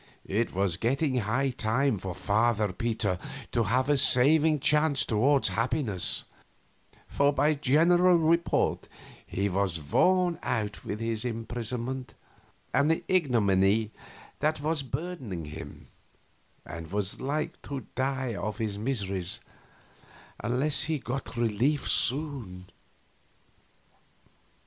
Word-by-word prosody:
It 110 +4 -1
was 95 -3 +1
getting 130 - 0
high 125 +5 0
time 115 0 0
for 90 -1 -5
Father 105 0 +1
Peter 110 -3 -1 0.3
to 115 -3 +1
have 130 +6 +1
a 145 -1 +3
saving 150 +5 +4
change 150 0 +3
toward 130 +6 +2
happiness, 115 - +1 0.8
for 140 0 +2
by 145 +2 +2
general 170 +6 +4
report 170 +1 +1 0.4
he 100 +2 -1
was 95 -3 -1
worn 180 - +2
out 105 -2 -3
with 105 - -5
his 115 -1 -1
imprisonment 120 +2 -4 0.6
and 145 +2 +3
the 160 - +1
ignominy 110 - +2 0.5
that 155 +1 0
was 155 +1 -1
burdening 130 - -5
him, 75 +2 -9 0.8
and 85 +1 -8
was 100 -1 -2
like 145 +3 -3
to 140 -2 -6
die 130 -2 -1
of 105 +1 -4
his 105 -3 -3
miseries 100 -7 -2 1.0
unless 130 +6 0
he 160 0 -1
got 130 -1 -5
relief 120 +6 +1
soon. 125 -10 +1
125 Hz, 110 wpm, -28 LUFS, 105-145 Hz, 1.0 s, saving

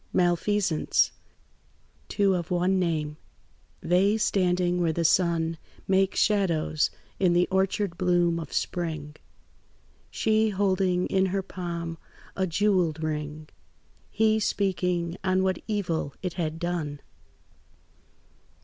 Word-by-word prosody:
MALFEASANCE 175 -1 +2 1.0
Two 200 -2 +2
of 175 -3 -2
one 180 +2 +2
name; 155 -4 -1 0.6
they 190 +5 +3
standing 180 -4 +1
where 165 -2 +2
the 165 +1 -1
sun 165 -1 +2 0.3
Makes 190 0 +2
shadows 170 -7 +2 0.3
in 180 -3 +3
the 175 +1 +3
orchard 190 -1 0
bloom 175 -2 +2
of 160 - -7
spring; 155 -4 -3 0.9
She 220 0 +2
holding 190 -2 +1
in 190 -1 +1
her 195 +1 -1
palm 170 -3 -5 0.4
a 190 -1 0
jewelled 175 -4 +1
ring, 150 0 -4 0.6
He 220 0 +2
speaking 180 -4 -1
on 185 0 +2
what 190 0 0
evil 175 -9 -2
it 180 -2 -2
had 160 -3 -3
done. 165 -4 -3
180 Hz, 110 wpm, -26 LUFS, 165-190 Hz, 1.0 s, they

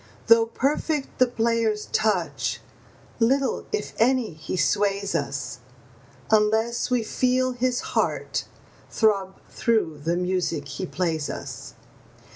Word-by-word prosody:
Though 230 0 +6
perfect 280 +4 -1
the 255 - +6
player's 230 -2 0
touch, 180 -10 0 0.6
little, 265 +4 +1
if 425 - -2
any, 245 -3 +2
he 155 +4 -5
sways 200 0 +1
us, 140 -4 -3 0.7
Unless 220 +2 +2
we 250 -2 +1
feel 255 +3 +1
his 245 0 0
heart - - 0 0.4
throb 195 -4 +1 0.2
through 215 -10 0
the 170 +2 0
music 180 -5 -1
he 180 +7 -4
plays 165 -5 -1
us. - - -7
215 Hz, 110 wpm, -25 LUFS, 180-240 Hz, 0.7 s, Though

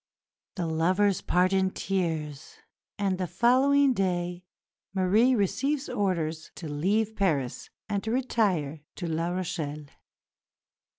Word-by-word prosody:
The 180 - -2
lovers 180 +5 +2
part 180 +2 +2
in 190 0 +3
tears, 160 -7 -3 0.4
and 195 -3 0
the 185 - -1
following 265 - +4
day 180 -3 -1 0.5
Marie 210 +7 +4
receives 270 +8 0
orders 165 -5 -1
to 165 - -7
leave 205 +9 0
Paris 150 - -1 0.2
and 200 -2 -2
to - - -2
retire 200 - 0
to 180 - -5
La 165 +1 -1
Rochelle. 160 -5 -3
185 Hz, 115 wpm, -27 LUFS, 165-205 Hz, 0.5 s, following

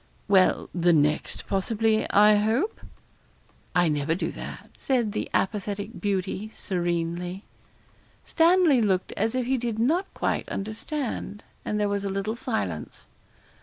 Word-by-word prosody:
'Well, 190 -2 +4
the 175 0 +3
next 150 -1 +1
possibly, 215 +3 +1
I 210 +1 +6
hope?' 230 - 0 0.9
'I 175 -2 +4
never 150 +2 0
do 185 - -2
that,' - - -9
said 245 -6 0
the 215 - -3
apathetic 205 +2 -2
beauty, 195 +1 -2
serenely. 175 -1 -3 0.8
Stanley 330 -5 +4
looked 190 -4 +1
as 220 +4 -1
if 255 -1 0
he 260 +1 +1
did 230 -2 -2
not 320 - +1
quite - - -1
understand, 220 0 -4 0.2
and 210 - -2
there 210 - +2
was 200 0 -1
a 200 - -2
little 195 +3 -2
silence. 95 - -4
205 Hz, 130 wpm, -26 LUFS, 185-230 Hz, 0.9 s, I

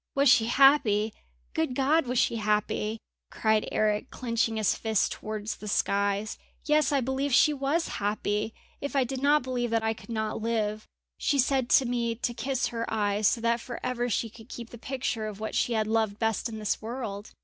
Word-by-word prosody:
"Was 275 0 +5
she 230 -3 +6
happy! 235 -5 +4 0.4
Good 250 +10 -1
God! 285 +3 +2
was 250 +1 -1
she 230 - +2
happy!" 210 0 0 0.3
cried 220 -1 +1
Eric, 215 +4 +1
clenching 230 -2 -1
his 215 -3 +2
fists 220 -3 +1
towards 215 0 -5
the 210 - -9
skies. 200 +1 0 0.3
"Yes, 300 -2 +3
I 280 -2 +2
believe 265 +3 -1
she 300 +4 +5
was 285 +4 0
happy! 210 +1 -1 0.3
If 285 0 -4
I 270 - +4
did 260 +1 -4
not 290 +1 +4
believe 245 -2 -2
that 225 0 +1
I 220 0 +1
could 225 - -15
not 220 -1 -2
live. 215 -2 -1 0.3
She 285 - +1
said 265 -1 +2
to 265 - +5
me 235 -1 -1
to 240 +1 -2
kiss 265 +1 -1
her 230 -1 -4
eyes 205 -1 +1
so 230 - +1
that 235 0 +1
for 240 0 -7
ever 245 -1 -1
she 230 - 0
could 225 0 -15
keep 235 -1 -8
the 235 - -10
picture 240 -3 -3
of 210 -1 -7
what 220 - -4
she 240 - +1
had 220 -1 +1
loved 220 -2 0
best 225 +1 0
in 220 - -6
this 210 -1 -1
world! 220 -3 -5
230 Hz, 200 wpm, -28 LUFS, 215-255 Hz, 0.4 s, she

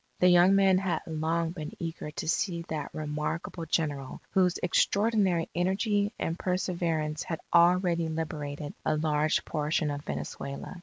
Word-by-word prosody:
The 180 - +6
young 180 +2 +6
men 190 -1 +5
had 180 -4 -1
long 165 +1 -1
been 155 -4 -6
eager 165 -2 -5
to 155 - -5
see 170 0 0
that 150 -2 -3
remarkable 155 +2 -4
General 145 -4 -1
whose 180 -2 +3
extraordinary 200 -2 +2
energy 200 +3 +1
and 165 +2 -3
perseverance 170 -4 -1
had 165 -3 -4
already 170 -1 +4
liberated 150 -2 -4
a 155 - +1
large 155 0 +1
portion 150 0 0
of 145 0 -4
Venezuela. 140 +6 -5
165 Hz, 140 wpm, -29 LUFS, 155-180 Hz, -, The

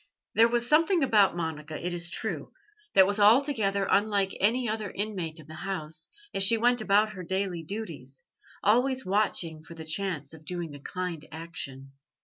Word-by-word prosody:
There 225 +1 +6
was 240 0 0
something 325 +4 +3
about 210 -8 +4
Monica, 155 -2 -4
it 180 +1 -3
is 175 0 0
true, - - -3 0.4
that 190 - +8
was 205 +2 -1
altogether 210 -3 +3
unlike 200 -2 +2
any 235 +5 +2
other 215 -2 -2
inmate 185 -6 -3
of 155 - -12
the 155 - -12
house, 160 -3 -3 0.2
as 195 - -1
she 225 +4 +6
went 245 +1 +3
about 210 +1 +3
her 185 -3 -8
daily 190 -1 -2
duties, 160 - -7 0.4
always 255 +5 +2
watching 185 -5 -1
for 170 - -11
the 160 -1 -8
chance 160 -3 -2
of 160 -1 -13
doing 170 -2 -5
a 145 - -9
kind 175 +1 -5
action. 140 -5 -5
195 Hz, 170 wpm, -28 LUFS, 160-215 Hz, 0.4 s, that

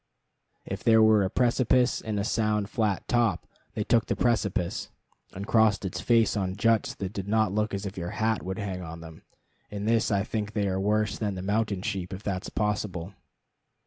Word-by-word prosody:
If - - -5
there 110 -1 +5
were 110 -1 +5
a 95 - +1
precipice 125 +1 +2
and 105 -2 -3
a - - 0
sound 105 -1 0
flat 105 -4 -1
top, 120 -3 +1 0.3
they 105 - -1
took 115 +1 +2
the - - 0
precipice, 105 -7 0 0.4
and 100 +2 -6
crossed 110 -2 +3
its 95 - -4
face 115 -2 +3
on 95 -2 -1
juts 115 +2 +1
that 95 0 -5
did 100 -2 -5
not 110 -2 +2
look 105 +1 0
as 100 +1 -4
if 95 -1 -5
your 85 0 -4
hat 110 0 +1
would 95 +1 -4
hang 95 -4 -4
on 85 -1 -8
them. 80 -1 -11 0.5
In 105 0 -5
this 115 0 +2
I 100 -2 +1
think 105 -1 -3
they 100 -2 0
are 95 0 -1
worse 105 +1 0
than 105 -3 -1
the 90 - -5
mountain 100 -1 0
sheep, 95 -4 -3
if 95 - -11
that 95 -2 -3
is - - -5
possible. 100 -4 -2
105 Hz, 205 wpm, -27 LUFS, 95-110 Hz, 0.5 s, there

